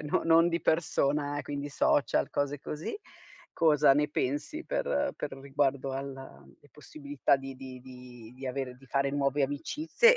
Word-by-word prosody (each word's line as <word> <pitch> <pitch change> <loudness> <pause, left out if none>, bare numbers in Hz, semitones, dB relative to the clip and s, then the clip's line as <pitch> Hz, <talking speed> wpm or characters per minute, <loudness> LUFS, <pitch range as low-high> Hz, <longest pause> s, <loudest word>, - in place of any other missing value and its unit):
cioè - - -6
non 150 +2 0
non 165 +1 +6
di 170 0 -1
persona, 145 -3 +1
quindi 145 0 -4
social, 145 0 +2
cose 145 0 -1
così, 150 - -5 0.5
cosa 150 -4 +5
ne 150 +1 +2
pensi 145 - -2
per - - 0
per 145 - -4
riguardo 135 -1 0
alla 135 0 -7 0.3
possibilità 145 -1 -1
di 135 0 -8
di 125 -3 -11
di 135 +1 -7
avere 130 -1 -3
di 135 +1 -18
fare 140 +1 +1
nuove 140 0 +1
amicizie 310 - +3
140 Hz, 150 wpm, -30 LUFS, 135-150 Hz, 0.5 s, non